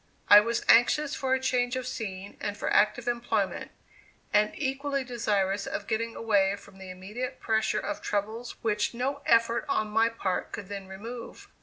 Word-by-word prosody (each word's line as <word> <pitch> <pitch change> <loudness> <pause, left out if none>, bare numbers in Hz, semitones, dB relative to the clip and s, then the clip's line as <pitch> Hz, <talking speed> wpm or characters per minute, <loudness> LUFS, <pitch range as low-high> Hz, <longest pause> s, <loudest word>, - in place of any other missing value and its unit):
I 205 - +12
was 230 +2 -1
anxious 280 +5 +5
for 260 -1 +1
a - - -1
change 250 -1 0
of 255 -1 -3
scene 195 -2 -5
and 205 - -3
for - - -2
active 215 +3 +3
employment, 240 0 -1 0.6
and 210 0 +4
equally 275 0 -1
desirous 205 -5 -1
of 205 - -4
getting 230 +1 -2
away 200 -3 +2
from 195 - -16
the 190 -1 -9
immediate 210 +8 -6
pressure 220 -1 +1
of 205 0 -4
troubles 215 +4 -3
which 210 0 0
no 275 +4 -2
effort 230 0 +3
on 215 -5 0
my 225 +2 +3
part 195 -5 -3
could 200 -3 -6
then 200 -1 -6
remove. 225 +5 -9
225 Hz, 170 wpm, -28 LUFS, 205-245 Hz, 0.6 s, I